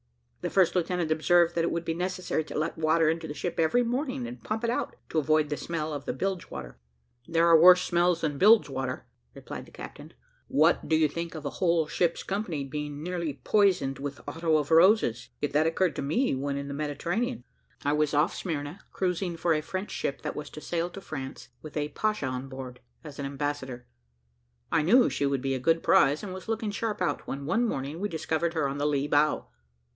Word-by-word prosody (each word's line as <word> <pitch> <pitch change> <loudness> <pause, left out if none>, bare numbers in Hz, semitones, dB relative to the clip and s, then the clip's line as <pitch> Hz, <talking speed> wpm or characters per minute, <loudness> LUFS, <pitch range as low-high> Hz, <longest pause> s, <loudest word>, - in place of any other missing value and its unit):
The - - -2
first 190 -3 +3
lieutenant 175 -2 0
observed 170 +2 +4
that 170 - +1
it 170 - +1
would 170 0 -3
be 165 - 0
necessary 180 -1 -2
to - - -6
let 155 +2 -1
water 160 0 +2
into 165 +1 0
the 145 - -6
ship 175 +1 -4
every 165 +10 +3
morning, 255 +1 -2
and 245 +1 -8
pump 220 +2 -3
it 235 - +1
out, - - -2
to 160 - +1
avoid 155 0 +2
the 150 - -2
smell 155 -2 -3
of 145 -1 -5
the - - -2
bilge 185 +5 -3
water. - - -8 0.5
"There 165 0 +3
are 170 -1 +7
worse 180 +1 +8
smells 175 -1 +2
than 145 -3 -2
bilge 210 -5 +6
water," 135 -2 -4 0.3
replied - - -8
the - - -17
captain. - - -10 0.3
"What 160 +4 +3
do 160 - +4
you 155 -1 +4
think 170 +3 -5
of 155 -2 -7
a - - -2
whole 170 -3 +3
ship's 170 +3 0
company 190 -7 -2
being 150 +1 -5
nearly 170 -5 -3
poisoned 185 -10 +2
with 140 0 -5
otto 165 -1 +1
of 150 +1 -2
roses? 160 - +4
Yet 145 - -2
that 155 +2 +3
occurred 165 -1 +1
to - - -1
me 160 - +1
when 140 +1 -2
in 140 0 -4
the 140 - -5
Mediterranean. 175 - -2 0.4
I 145 - +2
was 150 -1 +1
off 150 +6 +3
Smyrna, 155 -1 -4
cruising 180 -2 -1
for 165 0 +2
a 155 - 0
French 185 +6 -5
ship, 140 - -3
that - - -3
was 150 0 -6
to 155 - -10
sail 170 +1 -2
to 195 - -9
France, 135 -7 -7
with 155 0 -8
a 150 0 -1
pacha 215 -6 -1
on 130 +1 -4
board, 130 -2 -8 0.2
as 150 -3 -10
an 140 - -2
ambassador. 140 -3 -4 0.9
I - - +3
knew 235 +11 +5
she 140 - 0
would 135 -2 -1
be 135 0 0
a 130 - -1
good 165 +6 +2
prize, 145 +6 +4
and 190 -3 -5
was 185 - -9
looking 220 -1 -2
sharp 215 +1 -3
out, 175 - -2
when 140 +1 -4
one 195 +10 +1
morning 145 - -2
we 205 +2 -2
discovered 165 0 -1
her 155 -3 +1
on 140 +1 -4
the 145 - +1
lee 145 -1 0
bow. 150 0 +2
160 Hz, 220 wpm, -28 LUFS, 145-180 Hz, 0.9 s, worse